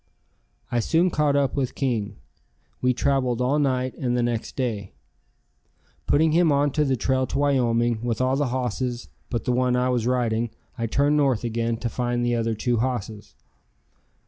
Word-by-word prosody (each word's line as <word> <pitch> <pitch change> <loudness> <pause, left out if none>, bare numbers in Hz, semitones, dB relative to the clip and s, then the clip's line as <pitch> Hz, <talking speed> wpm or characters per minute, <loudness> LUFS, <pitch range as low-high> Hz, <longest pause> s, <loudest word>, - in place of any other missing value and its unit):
I 120 - +1
soon 170 +9 +2
caught 150 -2 +2
up 140 -2 +1
with 135 -3 -1
King. 115 -7 -1 0.7
We 125 - +3
traveled 130 -2 0
all 130 +4 +1
night 130 -2 0
and 125 -2 0
the 120 - +1
next 120 -1 -2
day. 110 -7 -3 1.1
Putting 155 +2 +3
him 165 0 +4
on 145 0 +2
the 140 -2 +1
trail 130 +2 0
to 135 - -3
Wyoming 120 -5 +1
with 120 -1 -2
all 130 +1 +2
the 145 0 0
hosses 125 -1 -3 0.2
but 120 -3 -2
the 125 - +1
one 125 0 +2
I 125 0 +1
was 120 -2 0
riding, 120 -2 0 0.3
I 115 -2 -2
turned 145 +5 +2
north 135 -6 +2
again 115 0 -1
to 120 - -3
find 120 +1 -1
the 120 - +1
other 115 -1 0
two 120 +2 0
hosses. 110 -3 -3
125 Hz, 170 wpm, -24 LUFS, 120-135 Hz, 1.1 s, him